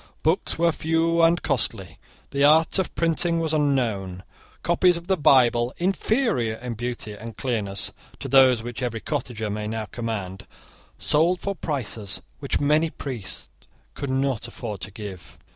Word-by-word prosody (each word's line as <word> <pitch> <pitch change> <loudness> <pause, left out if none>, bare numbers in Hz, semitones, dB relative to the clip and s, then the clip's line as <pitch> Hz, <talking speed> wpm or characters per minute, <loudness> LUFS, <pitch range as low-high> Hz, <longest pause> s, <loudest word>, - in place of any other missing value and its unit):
Books 160 +4 +1
were 170 +1 +3
few 165 +1 +1
and 165 +1 +4
costly. 105 - -1 0.3
The 140 0 +1
art 160 +5 +5
of 190 - -2
printing 165 0 +1
was 160 -1 -1
unknown. 115 -11 0 0.4
Copies 175 +1 +3
of 170 - -9
the 190 +1 +2
Bible, 125 -5 +4
inferior 190 - +1
in 120 +1 -5
beauty 120 -1 -4
and 110 +2 -9
clearness 105 -6 -2 0.3
to - - -6
those 130 -3 +5
which 120 +2 -6
every 120 -3 -2
cottager 120 -7 -3
may 105 +1 -3
now 110 0 -3
command, 100 -5 -5 0.5
sold 170 +4 +2
for 200 - -2
prices 115 - -3 0.2
which 140 -1 -1
many 150 +3 +3
priests 105 - -5 0.5
could 140 - -5
not 130 -3 0
afford 115 -4 -6
to - - -4
give. 100 -4 -9
130 Hz, 150 wpm, -24 LUFS, 110-160 Hz, 0.5 s, art